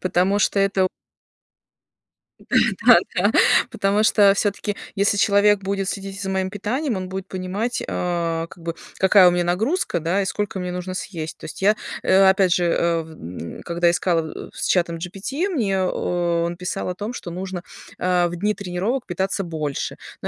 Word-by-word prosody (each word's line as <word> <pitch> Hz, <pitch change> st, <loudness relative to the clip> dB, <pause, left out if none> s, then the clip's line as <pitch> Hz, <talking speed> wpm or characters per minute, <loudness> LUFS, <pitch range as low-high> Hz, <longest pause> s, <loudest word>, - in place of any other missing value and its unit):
Потому 185 Hz, +2 st, +1 dB
что 200 Hz, -, +1 dB
это 195 Hz, -1 st, +2 dB, 1.5 s
Да-да-да. -, -, +3 dB, 0.4 s
Потому 200 Hz, +2 st, +1 dB
что, 205 Hz, -2 st, +5 dB
всё-таки, 205 Hz, 0 st, -1 dB, 0.2 s
если 200 Hz, +1 st, +2 dB
человек 205 Hz, 0 st, +4 dB
будет 195 Hz, 0 st, -2 dB
следить 195 Hz, -1 st, -5 dB
и -, -, -8 dB
за 195 Hz, -, -3 dB
моим 190 Hz, 0 st, -1 dB
питанием, 230 Hz, +6 st, -2 dB
он 185 Hz, 0 st, -4 dB
будет 190 Hz, 0 st, -5 dB
понимать, 190 Hz, +6 st, -3 dB
а, 170 Hz, -2 st, -1 dB
как 170 Hz, -, -15 dB
бы, 165 Hz, 0 st, -3 dB, 0.2 s
какая 190 Hz, -1 st, +6 dB
у 175 Hz, -, +6 dB
меня 175 Hz, 0 st, +1 dB
нагрузка, 195 Hz, -, 0 dB
да, 170 Hz, +5 st, 0 dB
и -, -, -1 dB
сколько 200 Hz, 0 st, -3 dB
мне 180 Hz, -1 st, -3 dB
нужно 180 Hz, +1 st, -5 dB
съесть. 160 Hz, -5 st, -5 dB
То -, -, -11 dB
есть 155 Hz, -, -8 dB
я, 210 Hz, +2 st, +4 dB, 0.3 s
э, 190 Hz, +1 st, +5 dB
опять 190 Hz, -2 st, +3 dB
же, 175 Hz, -2 st, +1 dB
а, 170 Hz, -1 st, +1 dB
в 160 Hz, -, -13 dB
м 85 Hz, -, -8 dB
когда 170 Hz, 0 st, +1 dB
искала, 170 Hz, -2 st, -1 dB
э, -, -, -17 dB
с -, -, -3 dB
чатом 170 Hz, -2 st, +1 dB
GPT, 195 Hz, -, -3 dB
мне 210 Hz, -, 0 dB
о 175 Hz, -2 st, 0 dB
он 170 Hz, 0 st, -4 dB
писал 180 Hz, +1 st, -3 dB
о 180 Hz, -, -3 dB
том, 210 Hz, +5 st, -5 dB
что 175 Hz, -7 st, -7 dB
нужно, 185 Hz, 0 st, -5 dB, 0.4 s
а, 180 Hz, -1 st, +2 dB
в 175 Hz, -, -5 dB
дни 205 Hz, +5 st, 0 dB
тренировок 200 Hz, +6 st, -3 dB
питаться 190 Hz, +2 st, -2 dB
больше. 155 Hz, -5 st, -4 dB, 0.2 s
Но -, -, -3 dB
185 Hz, 180 wpm, -22 LUFS, 175-200 Hz, 1.5 s, какая